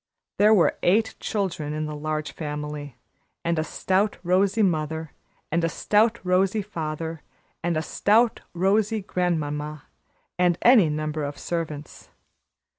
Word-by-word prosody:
There 210 +1 +6
were 200 -6 +4
eight 220 +5 +3
children 175 -8 -2
in 155 0 -2
the 150 0 -5
Large 155 -1 -3
Family, 150 -2 -5 0.5
and 170 -1 +1
a - - +1
stout, 190 +5 0
rosy 195 +4 +2
mother, 160 -3 -1 0.4
and 170 +2 +1
a 165 - +2
stout, 220 +6 +2
rosy 190 +3 +2
father, 160 -4 -5 0.4
and 170 -1 0
a 155 - -1
stout, 220 +8 +2
rosy 205 +4 +2
grand 180 -3 0
mamma, 150 0 -4 0.6
and 175 -1 +3
any 230 -10 +7
number 155 0 -2
of 145 0 -4
servants. 155 -4 -5
165 Hz, 135 wpm, -25 LUFS, 155-195 Hz, 0.6 s, any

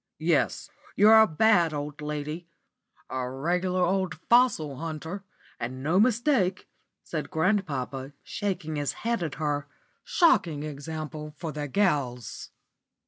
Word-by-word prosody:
"Yes, - - +1 0.3
you're 220 +2 +8
a 220 - +6
bad 170 -2 +3
old 145 +1 -5
lady 150 +3 -4 0.6
a 130 -1 -3
regular 180 +7 0
old 185 -2 0 0.2
fossil 235 - +4
hunter, 165 +5 -5 0.4
and 130 +3 -5
no 165 +6 +3
mistake," 230 -4 +2 0.4
said 155 -4 -4
grandpapa, 145 -7 -1
shaking 175 -6 -3
his 145 -1 -1
head 235 -3 +1
at 160 -5 -3
her. 145 -2 -2 0.4
"Shocking 235 - +3
example 150 0 -6
for 165 -1 -4
the 150 -1 -4
gals!" 135 - -1
160 Hz, 120 wpm, -27 LUFS, 145-190 Hz, 0.6 s, you're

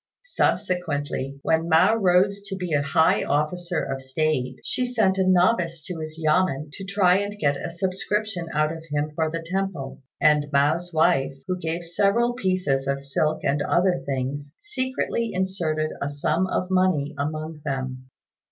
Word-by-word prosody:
Subsequently, 145 - -1
when 165 +1 +1
Mao 160 +7 +5
rose 195 0 +3
to 195 - -4
be 180 -4 -4
a 145 - +3
high 150 +3 +3
officer 170 +4 -1
of 135 0 -4
state, 130 -1 -1
she 255 - -1
sent 220 -6 +1
a 190 - +2
novice 175 -3 +2
to 180 -3 -5
his 155 0 -6
yamên 155 -2 +1
to 195 - -7
try 195 -2 +3
and 205 +1 -3
get 145 -7 +1
a - - -3
subscription 190 +1 -2
out 155 0 +1
of 165 0 -7
him 150 +1 -1
for 160 0 0
the 165 +1 -5
temple; 180 -8 -3 0.2
and 150 -2 +3
Mao's 155 +5 +2
wife, 140 -4 +2
who 185 - -1
gave 170 0 -3
several 200 +8 +2
pieces 185 - 0
of 140 0 0
silk 145 +3 -1
and 140 +1 +1
other 175 +3 +2
things, 140 +2 -4
secretly 260 - -2
inserted 170 -5 -1
a 140 - -1
sum 155 +5 0
of 185 0 -2
money 180 -6 +2
among 155 +1 -4
them. 130 -2 -4
165 Hz, 160 wpm, -24 LUFS, 145-185 Hz, 0.2 s, Mao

